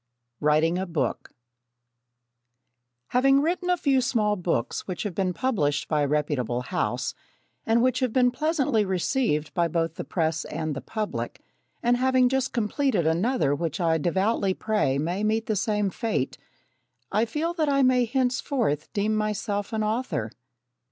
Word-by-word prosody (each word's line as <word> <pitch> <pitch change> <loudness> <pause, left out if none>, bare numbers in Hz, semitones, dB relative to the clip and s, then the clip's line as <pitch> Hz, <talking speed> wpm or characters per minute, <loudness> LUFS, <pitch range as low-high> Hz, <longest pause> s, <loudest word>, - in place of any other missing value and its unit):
Writing 155 +4 +2
a 190 - -3
Book 165 -3 -2 1.8
Having 270 +2 +4
written 355 +3 -1
a 360 - +3
few 275 -4 +2
small 215 -4 +1
books 170 - -2
which 185 -2 -3
have 205 -4 -3
been 185 0 0
published 160 - 0
by 150 -2 +1
a 145 - +2
reputable 140 -5 0
house, 125 - -2 0.5
and 230 +1 +3
which 255 0 +2
have 255 -3 0
been 250 +1 +3
pleasantly 275 -6 +1
received 185 - 0
by 170 -1 +2
both 165 -1 -1
the - - -3
press 160 -2 -1
and 155 -1 -3
the 140 - -5
public, 215 -2 -4 0.4
and 240 +1 +3
having 255 0 +3
just 265 0 0
completed 230 - 0
another 170 - +2
which 165 +5 -2
I 165 -2 +2
devoutly 190 +4 +1
pray 210 -11 0
may 175 +7 -1
meet 220 +1 +1
the 215 - -1
same 210 -1 0
fate, 220 - -2 0.8
I 215 +4 +2
feel 310 +8 -2
that 315 -4 0
I 275 -1 +3
may 255 -1 +4
henceforth 245 - -1
deem 215 +1 +1
myself 210 0 -2
an 220 -1 -1
author. 210 - -2
210 Hz, 155 wpm, -26 LUFS, 165-250 Hz, 1.8 s, Having